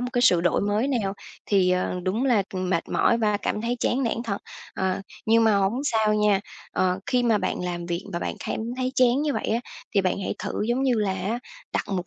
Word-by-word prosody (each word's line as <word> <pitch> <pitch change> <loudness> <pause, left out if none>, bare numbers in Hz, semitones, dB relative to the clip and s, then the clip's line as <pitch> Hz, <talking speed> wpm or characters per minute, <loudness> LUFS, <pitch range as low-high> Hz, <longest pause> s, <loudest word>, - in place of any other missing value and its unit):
một 250 - -2
cái 245 -1 +1
sự 180 -9 +5
đổi 175 -1 +2
mới 205 +5 +1
nào 215 -8 0 0.3
thì, 190 -3 +3
ờ, 180 0 0
đúng 205 +8 0
là, 235 -7 +3
ừm, 185 -1 -2
mệt 170 -2 0
mỏi 235 - +3
và 210 -2 +2
cảm 210 - -2
thấy 240 +1 -1
chán 265 +2 +1
nản 235 0 -1
thật. 200 -3 -2 0.4
Ờ, 190 0 -1 0.3
nhưng 225 +1 +5
mà 215 -2 +4
hổng 200 +7 +1
sao 220 -5 +2
nha. 210 -2 +3 0.3
Ờ, 185 0 +1
khi 250 -1 +2
mà 225 -3 +3
bạn - - -2
làm 175 -1 -3
việc 175 +2 -3
và 170 - -1
bạn - - -3
cảm - - -2 0.2
thấy 255 0 -1
chán 255 +2 +4
như 300 - +1
vậy - - -2
á, 230 +2 +1 0.3
thì 200 - +5
bạn 185 0 0
hãy - - -2
thử - - -3
giống 245 +3 +1
như 260 -2 +3
là 205 -3 +1
á 210 +5 -2 0.3
đặt - - 0
mục 185 -3 -2
210 Hz, 245 wpm, -25 LUFS, 190-240 Hz, 0.4 s, sự